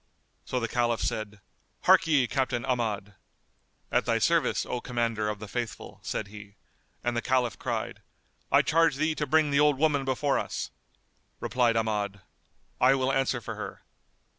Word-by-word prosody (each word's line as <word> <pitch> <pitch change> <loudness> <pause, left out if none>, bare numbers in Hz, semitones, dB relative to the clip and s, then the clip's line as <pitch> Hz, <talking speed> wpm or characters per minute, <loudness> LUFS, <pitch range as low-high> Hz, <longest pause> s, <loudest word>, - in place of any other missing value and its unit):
So 125 - -1
the 115 - -1
Caliph 120 0 0
said, 105 -1 -3 0.4
"Harkye, 145 -6 +5
Captain 130 -3 -1
Ahmad!" 105 -5 -1 0.8
"At - - +2
thy - - +2
service, - - +2
O 125 - -3
Commander 115 -4 -1
of 105 - -3
the 105 - -8
Faithful," 115 -1 -5
said 100 - -4
he; 100 -1 -11 0.5
and 120 0 0
the 120 - 0
Caliph 125 -3 0
cried, - - -3 0.5
"I - - +6
charge 165 -2 +3
thee 155 +3 +1
to 150 -1 -3
bring 155 +1 +3
the 140 - +3
old 150 -2 +4
woman 145 -1 +2
before 135 +2 +1
us." - - -4 0.7
Replied 120 -2 +1
Ahmad, 105 -3 -1 0.6
"I 130 +2 +5
will 130 0 +1
answer 135 -2 0
for - - -5
her." - - -7
120 Hz, 160 wpm, -28 LUFS, 110-135 Hz, 0.8 s, I